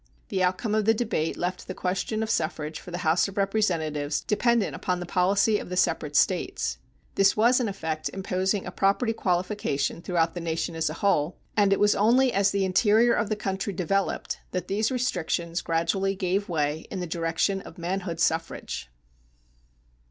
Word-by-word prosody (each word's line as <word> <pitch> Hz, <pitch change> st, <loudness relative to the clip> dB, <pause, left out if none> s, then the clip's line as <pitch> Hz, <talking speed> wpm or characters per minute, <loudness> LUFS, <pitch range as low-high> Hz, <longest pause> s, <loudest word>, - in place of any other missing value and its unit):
The 190 Hz, -2 st, -1 dB
outcome 185 Hz, +4 st, 0 dB
of 215 Hz, -1 st, +2 dB
the 225 Hz, +1 st, +4 dB
debate 210 Hz, -9 st, -1 dB
left 180 Hz, +1 st, -3 dB
the 185 Hz, -, -5 dB
question 190 Hz, +4 st, -1 dB
of 220 Hz, -, -4 dB
suffrage 155 Hz, -1 st, -2 dB
for -, -, -11 dB
the 175 Hz, -, -4 dB
House 160 Hz, +5 st, +3 dB
of 195 Hz, -, -10 dB
Representatives 160 Hz, -8 st, 0 dB
dependent 235 Hz, +1 st, +1 dB
upon 180 Hz, -1 st, -2 dB
the 175 Hz, -, -5 dB
policy 200 Hz, +4 st, +2 dB
of -, -, -8 dB
the 180 Hz, -, -3 dB
separate 185 Hz, -, 0 dB
States. -, -, +1 dB, 0.3 s
This 195 Hz, +1 st, +3 dB
was 240 Hz, +4 st, +5 dB
in 245 Hz, -, 0 dB
effect 160 Hz, -5 st, -3 dB
imposing 190 Hz, +1 st, -1 dB
a 180 Hz, -, -5 dB
property 200 Hz, +5 st, +1 dB
qualification 180 Hz, -5 st, -1 dB
throughout 170 Hz, -2 st, 0 dB
the 175 Hz, -, -5 dB
nation 165 Hz, +1 st, -2 dB
as 160 Hz, -1 st, 0 dB
a 155 Hz, -, -5 dB
whole, 165 Hz, -4 st, +2 dB, 0.2 s
and 205 Hz, -2 st, +4 dB
it 195 Hz, -, +3 dB
was 205 Hz, 0 st, +5 dB
only 245 Hz, +4 st, +3 dB
as 200 Hz, 0 st, +3 dB
the 195 Hz, -1 st, 0 dB
interior 220 Hz, +5 st, +4 dB
of 210 Hz, -, 0 dB
the 215 Hz, -, 0 dB
country 195 Hz, -1 st, -3 dB
developed 190 Hz, +2 st, -1 dB
that 180 Hz, -1 st, -2 dB
these 215 Hz, +3 st, +1 dB
restrictions 175 Hz, -9 st, -1 dB
gradually 190 Hz, +4 st, 0 dB
gave 190 Hz, +2 st, -1 dB
way 155 Hz, -1 st, -1 dB
in 190 Hz, -, -4 dB
the 180 Hz, -, -2 dB
direction 165 Hz, +4 st, 0 dB
of -, -, -12 dB
manhood 175 Hz, -1 st, -3 dB
suffrage. 160 Hz, -, -1 dB
190 Hz, 180 wpm, -26 LUFS, 170-205 Hz, 0.3 s, was